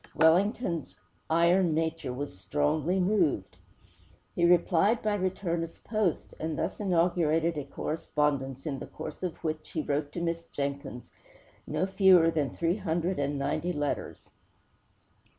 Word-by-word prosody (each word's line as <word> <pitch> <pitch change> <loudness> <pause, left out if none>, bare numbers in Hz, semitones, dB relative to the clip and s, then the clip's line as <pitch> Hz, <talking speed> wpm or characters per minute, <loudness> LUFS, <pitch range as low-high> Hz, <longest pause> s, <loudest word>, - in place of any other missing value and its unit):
Wellington's 170 - +2 0.3
iron 170 +1 +3
nature 160 -4 -1
was 140 -2 -5
strongly 150 - 0
moved. 180 - +1 0.8
He 170 - +2
replied 180 +5 +3
by 215 -1 +1
return 185 -3 -1
of 165 - -10
post, 215 -6 -1
and 160 -1 -3
thus - - -2
inaugurated 170 -3 +2
a 145 -2 -4
correspondence 140 -2 -2
in 140 -4 -3
the - - -7
course - - -8
of 180 -3 -3
which 155 -1 -3
he 155 - -1
wrote 145 0 -1
to - - -3
Miss 170 0 -1
Jenkins 140 -3 -5 0.6
no - - 0
fewer 190 -4 +5
than 150 -4 0
three 170 +3 0
hundred 175 -2 -1
and 140 0 -1
ninety 155 +5 -1
letters. 145 -2 -4
165 Hz, 135 wpm, -29 LUFS, 150-180 Hz, 0.8 s, fewer